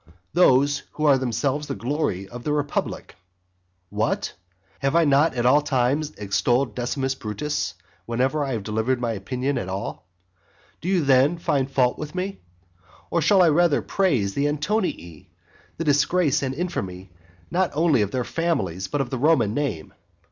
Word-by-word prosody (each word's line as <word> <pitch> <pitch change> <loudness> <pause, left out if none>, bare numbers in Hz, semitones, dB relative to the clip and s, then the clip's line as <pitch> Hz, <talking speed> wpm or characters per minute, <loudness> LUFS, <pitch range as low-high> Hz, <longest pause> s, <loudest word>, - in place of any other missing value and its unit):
Those 145 -4 +4
who 155 - -2
are 140 -3 +5
themselves 130 +4 -1
the 135 - -3
glory 120 - -2
of 120 +3 -9
the 150 - -1
republic. 145 -9 -3 0.7
What? - - -1 0.5
have 135 +3 0
I 170 -1 +5
not 145 +1 +3
at 120 -1 -1
all 145 +4 +5
times 140 +2 0
extolled 105 +5 +1
Decimus 130 +3 -2
Brutus 105 -3 -3 0.3
whenever 130 +5 0
I 135 -2 -2
have 110 -4 -3
delivered 110 +4 0
my 120 -1 -1
opinion 125 +6 -2
at 95 - -5
all? 95 -1 -5 0.7
Do 180 - -3
you 185 -4 +2
then 135 +5 +4
find 140 -5 0
fault 125 -2 +1
with 150 +1 -6
me? 190 +2 -3 0.7
or 170 - +2
should 185 +5 +5
I 175 - +6
rather 165 0 +3
praise 130 - +1
the 140 +5 +1
Antonii, 150 - -2 0.5
the 165 - -2
disgrace 150 +1 +2
and 135 -1 -2
infamy 95 - -4 0.4
not 185 0 +1
only 155 -6 +3
of 100 - 0
their 130 +4 -2
own - - -4
families, 95 - -1
but 145 +7 -1
of 125 - -4
the 130 - -2
Roman 145 -7 +3
name? 125 - -3
135 Hz, 165 wpm, -24 LUFS, 120-150 Hz, 0.7 s, I